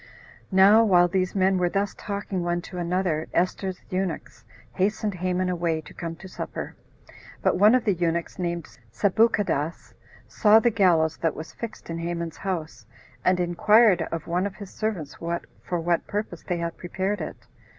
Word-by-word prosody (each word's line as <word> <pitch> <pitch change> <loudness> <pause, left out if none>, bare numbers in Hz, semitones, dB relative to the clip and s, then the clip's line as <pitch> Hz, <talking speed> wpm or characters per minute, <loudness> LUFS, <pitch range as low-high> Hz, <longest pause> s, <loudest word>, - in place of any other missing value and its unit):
11. - - -3
Now 205 +4 +7
while 180 -5 +5
these 185 +1 -1
men 190 -1 +3
were 175 -1 +2
thus 200 +2 -1
talking 200 -2 -4
one 175 0 0
to 180 - -7
another, 175 -2 -1
Esther's 185 +1 0
eunuchs 185 -10 -3 0.3
hastened 205 +2 0
Haman 185 +1 -1
away 170 -3 0
to 155 - -14
come 165 -1 -5
to 190 - -11
supper; 185 - -6 0.7
but - - +2
one 210 +4 +7
of 255 - +1
the 205 - +3
eunuchs, 170 0 -2
named 170 -2 -2 0.3
Sabuchadas, 200 - +1 0.3
saw 215 -1 +5
the 235 +1 +2
gallows 170 -7 +3
that 165 - 0
was 155 - -8
fixed 220 -7 -7
in 165 - -4
Haman's 170 -1 -4
house, 175 -5 -4 0.4
and 185 0 +3
inquired 185 +3 +4
of 165 -1 -4
one 180 +3 0
of 195 - -9
his 200 -1 -10
servants 190 -10 -3 0.5
for 175 - -2
what 170 0 0
purpose 205 -5 -4
they 175 - -2
had 170 -1 -4
prepared 190 +2 -2
it. 155 - -5
180 Hz, 170 wpm, -25 LUFS, 170-200 Hz, 0.7 s, Now